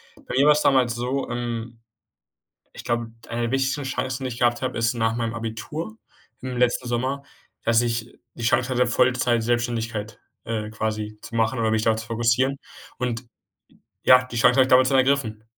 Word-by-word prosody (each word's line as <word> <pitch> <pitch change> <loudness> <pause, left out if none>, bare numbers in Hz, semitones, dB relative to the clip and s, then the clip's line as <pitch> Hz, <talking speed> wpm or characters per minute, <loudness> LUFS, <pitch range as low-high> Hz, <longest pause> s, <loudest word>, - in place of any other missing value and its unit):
Bei - - -10
mir 135 +2 +4
war 150 - +8
es 150 - 0
damals 125 -3 +3
so 125 +3 -2
ähm, 120 -1 -4 1.0
ich - - -9
glaube, 120 -1 -2 0.2
eine 120 0 -2
der 120 - -1
wichtigsten 135 +2 0
Chancen, 130 0 -3
die 130 - -2
ich 120 -1 -7
gehabt 120 0 +2
habe, 130 -1 -2
ist 115 +1 +1
nach 115 -1 0
meinem 115 -1 -2
Abitur 115 - -5 0.4
im 130 -1 -5
letzten 125 0 +1
Sommer, 130 +4 -1 0.4
dass 115 0 +3
ich 120 -1 -2 0.2
die 120 - -7
Chance 120 +2 +2
hatte, 125 0 +3
Vollzeit-Selbständigkeit, 120 -3 0 0.2
äh, 110 -2 -3
quasi 110 -1 -3
zu 115 - -9
machen 115 +2 +1
oder 110 -1 +1
mich 110 0 +1
darauf 110 -1 +2
zu 110 - -7
fokussieren. 120 +4 +1 0.4
Und 120 -2 -2
j 125 - -26 0.8
ja, 125 0 +7
die 125 -2 -8
Chancen 120 +1 +5
habe 135 - +7
ich 130 - +1
damals 130 0 +6
dann 135 0 +3
ergriffen. 130 -5 +1
120 Hz, 190 wpm, -24 LUFS, 115-130 Hz, 1.0 s, war